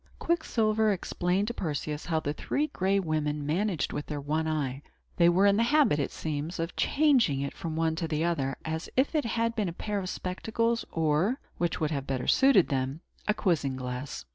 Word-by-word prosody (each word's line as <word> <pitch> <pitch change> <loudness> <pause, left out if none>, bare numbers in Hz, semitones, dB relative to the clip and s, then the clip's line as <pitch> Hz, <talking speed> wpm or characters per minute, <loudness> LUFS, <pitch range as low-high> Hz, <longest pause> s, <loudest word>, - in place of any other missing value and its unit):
Quicksilver 220 -10 +1
explained 185 0 0
to - - -3
Perseus 150 -4 -3
how 160 -2 +1
the 145 -1 -2
Three 285 - -1
Gray 195 -9 0
Women 150 -4 -1
managed 175 +2 0
with 145 - -4
their 150 -1 -3
one 155 +3 -1
eye. 140 -4 -2 0.4
They 170 -1 +6
were 185 +3 +4
in 200 0 +5
the - - +3
habit, 270 - +3
it 140 - 0
seems, 155 +2 -4
of 165 0 -3
changing 265 - +3
it 140 - -3
from 160 -2 -5
one 160 0 +1
to 165 - -1
another, 150 -4 0
as 160 +1 -3
if 265 +5 +3
it 305 -4 +1
had 230 0 0
been 210 -5 0
a - - -6
pair 205 +3 -3
of 185 -1 -4
spectacles, 230 +6 -1
or 165 - +1 0.2
which 175 -1 0
would 155 -1 0
have 140 -3 -2 0.3
suited 265 -10 +5
them 130 -1 0 0.2
better - - -30
a 210 - +4
quizzing 145 -8 0
glass. 125 - -5
170 Hz, 195 wpm, -28 LUFS, 150-215 Hz, 0.4 s, They